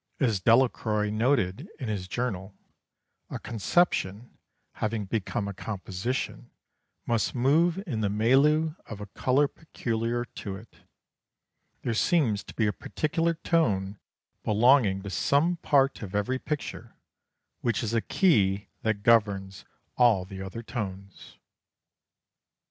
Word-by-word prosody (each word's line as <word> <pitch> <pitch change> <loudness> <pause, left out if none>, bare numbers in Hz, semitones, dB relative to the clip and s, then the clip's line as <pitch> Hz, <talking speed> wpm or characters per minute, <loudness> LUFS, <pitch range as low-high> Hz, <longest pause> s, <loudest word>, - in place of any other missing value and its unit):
As 115 -8 +2
Delacroix 110 -2 +2
noted 115 - 0
in 130 - -4
his 100 -4 -3
journal: 95 -2 -3 0.7
"A - - -4
conception 115 - 0 0.5
having 110 -1 -1
become 100 0 -2
a 100 - -4
composition 100 +4 -4 0.6
must 115 +1 0
move 160 +8 +3
in 120 - -3
the 105 - +1
milieu 140 +9 +3
of 105 - -7
a 105 - -6
colour 130 +7 +1
peculiar 120 -6 -3
to 100 -3 -7
it. 110 +4 -14 1.1
There 120 - -1
seems 115 - +2
to - - -11
be 110 - +1
a 105 - +1
particular 165 - -1
tone 105 - 0 0.4
belonging 105 -3 +4
to 100 - -6
some 160 - +2
part 140 -3 +2
of 100 -2 -6
every 115 +6 0
picture 150 0 -5 0.6
which 120 0 -1
is 115 0 -2
a 115 - +2
key 105 - +2
that 110 -2 -1
governs 100 -4 +2 0.3
all 115 -7 +4
the 95 0 -8
other 95 +5 -6
tones." 100 -5 -7
115 Hz, 125 wpm, -27 LUFS, 100-135 Hz, 1.1 s, belonging